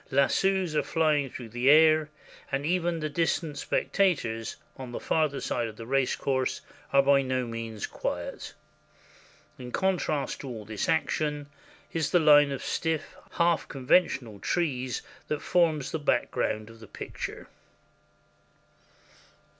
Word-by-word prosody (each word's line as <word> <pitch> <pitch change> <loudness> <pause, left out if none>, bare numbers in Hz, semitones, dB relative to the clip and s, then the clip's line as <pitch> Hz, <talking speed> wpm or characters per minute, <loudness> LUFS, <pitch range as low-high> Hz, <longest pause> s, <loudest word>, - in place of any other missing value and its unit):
Lassos 180 +5 +2
are - - +3
flying 150 -4 +1
through 120 -2 -8
the 120 +4 +1
air, 155 0 +6 0.4
and 135 +1 -1
even 170 -1 0
the 155 - -1
distant 160 0 -1
spec - - -1
tators 120 - +1 0.2
on 130 -2 -8
the - - -4
farther 155 -3 0
side 120 -1 -1
of 110 - -9
the 115 - -8
race 135 +1 +1
course 130 -2 -1 0.3
are 140 0 +5
by 140 0 +5
no 130 -1 -1
means 115 -2 -5
quiet. - - -5 1.0
In 125 -1 -8
contrast 160 -8 -1
with 135 - -6
all 110 -3 -7
this 105 -1 -3
action 150 -2 0 0.4
is 160 -3 0
the 175 - +4
line 145 -2 +6
of 135 - -4
stiff, 160 -1 -2 0.2
half 170 -1 +2
conventional 130 - +1
trees 130 - -1 0.2
that 150 - -1
forms 160 -6 +2
the 160 - -2
background 110 -6 0
of 115 - -15
the 110 - -12
picture. - - -7
140 Hz, 140 wpm, -28 LUFS, 125-160 Hz, 1.0 s, air